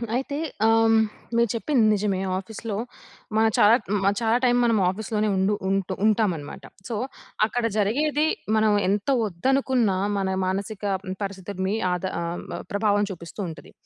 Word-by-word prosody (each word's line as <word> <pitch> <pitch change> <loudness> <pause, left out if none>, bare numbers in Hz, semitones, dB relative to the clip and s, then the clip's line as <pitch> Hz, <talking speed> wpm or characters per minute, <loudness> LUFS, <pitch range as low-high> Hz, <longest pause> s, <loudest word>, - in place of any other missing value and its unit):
అయితే 270 +3 -2 0.3
ఆహ్, 225 - +5
హ్మ్, 225 0 +5 0.4
మీరు 235 -2 +3
చెప్పింది 235 0 +2
నిజమే. 200 -2 0 0.2
ఆఫీస్‌లో 205 +2 -5 0.6
మనం 220 0 +4
చాలా 210 +3 +7
హ్మ్. 205 -1 0 0.2
చాలా 225 +1 +3
టైమ్ 245 0 +4
మనం 230 -2 +3
ఆఫీస్‌లోనే 215 +2 -2
ఉండు 190 +2 +2 0.2
ఉంటు 195 -1 0
ఉంటామన్నమాట. 200 -9 0 0.2
సో, 230 - -2 0.5
అక్కడ 240 +1 -2
జరిగేది 295 +9 +1 0.3
మనం 215 0 +3 0.2
ఎంత 205 +5 0 0.2
వద్దనుకున్నా, 240 +1 +1 0.2
మన 195 -1 0 0.2
మానసిక 195 +2 -3 0.4
పరిస్థితులని 195 0 -3 0.2
ఆద 180 -1 -2 0.2
ఆహ్, 170 +1 -3
మ - - -4
ప్రభావం 205 0 +2
చూపిస్తూ 170 +1 -10
ఉంటది. 160 - -11
210 Hz, 140 wpm, -24 LUFS, 195-225 Hz, 0.6 s, చాలా